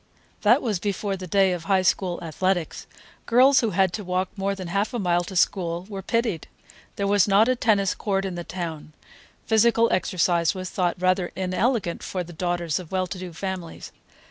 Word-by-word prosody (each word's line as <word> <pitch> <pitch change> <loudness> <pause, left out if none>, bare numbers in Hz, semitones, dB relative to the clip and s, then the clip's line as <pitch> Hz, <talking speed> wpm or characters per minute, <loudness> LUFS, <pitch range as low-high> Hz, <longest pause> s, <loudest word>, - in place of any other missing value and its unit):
That - - +4
was 215 -7 -1
before 200 +1 -2
the 185 -1 -8
day 195 +1 +3
of 175 -2 -4
High 195 -2 +2
School 180 -1 +1
athletics. 175 +2 -2 0.4
Girls 260 +3 +6
who 230 - +1
had 190 -2 +1
to 210 - -4
walk 185 0 -1
more 195 0 -1
than 185 -3 -7
half 200 +7 -1
a - - 0
mile 175 -4 +1
to 190 - -8
school 175 -1 0
were 195 -2 -5
pitied. 225 -4 -1 0.5
There 200 - -2
was 200 -1 +3
not 205 +3 +5
a 255 - +2
tennis 205 -5 +2
court 195 -2 -1
in 190 - -3
the 175 0 -5
town; 165 -3 -6 0.5
physical 230 +1 +3
exercise 175 -2 +1
was 185 -1 -5
thought 175 -1 -1
rather 185 0 +1
inelegant 185 +1 -1
for 185 -2 -4
the 175 0 -11
daughters 175 -1 -1
of 175 -4 -11
well 185 -1 0
to 185 +1 -7
do 180 -1 -7
families. 180 0 -6
185 Hz, 195 wpm, -24 LUFS, 175-200 Hz, 0.5 s, Girls